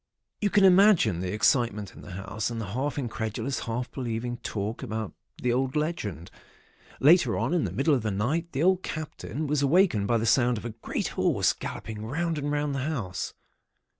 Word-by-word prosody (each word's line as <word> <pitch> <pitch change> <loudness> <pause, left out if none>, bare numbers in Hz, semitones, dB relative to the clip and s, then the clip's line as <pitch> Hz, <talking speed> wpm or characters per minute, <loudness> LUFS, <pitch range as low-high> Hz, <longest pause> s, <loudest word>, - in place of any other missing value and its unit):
"You 205 - +2
can 200 0 +4
imagine 185 - +6
the 90 0 -2
excitement 105 -1 +1
in - - -12
the 100 - -10
house, 100 +4 -3
and 115 -1 -4
the 100 -4 -5
half 140 +5 -2
incredulous, 120 0 -3
half 120 +2 -3
believing 120 -1 -3
talk 105 +1 -4
about 110 -2 -4 0.3
the 125 -1 +1
old 130 +2 0
legend. 110 - -3 0.7
Later 145 -5 +5
on, 120 +8 0
in 175 -5 +2
the - - -3
middle 145 +3 +2
of 130 - +2
the 110 - -1
night, 140 - -1
the 140 +3 -1
old 185 +1 +4
Captain 155 -1 -5
was 145 0 0
awakened 140 - +3
by 120 - +3
the 115 - -1
sound 120 +1 +3
of 105 - -7
a 120 - -3
great 110 +1 -3
horse - - +2
galloping 110 -1 -6
round 160 +7 -1
and 145 0 -2
round 145 -1 0
the 135 - -2
house. 125 -10 -3
125 Hz, 195 wpm, -27 LUFS, 110-150 Hz, 0.7 s, imagine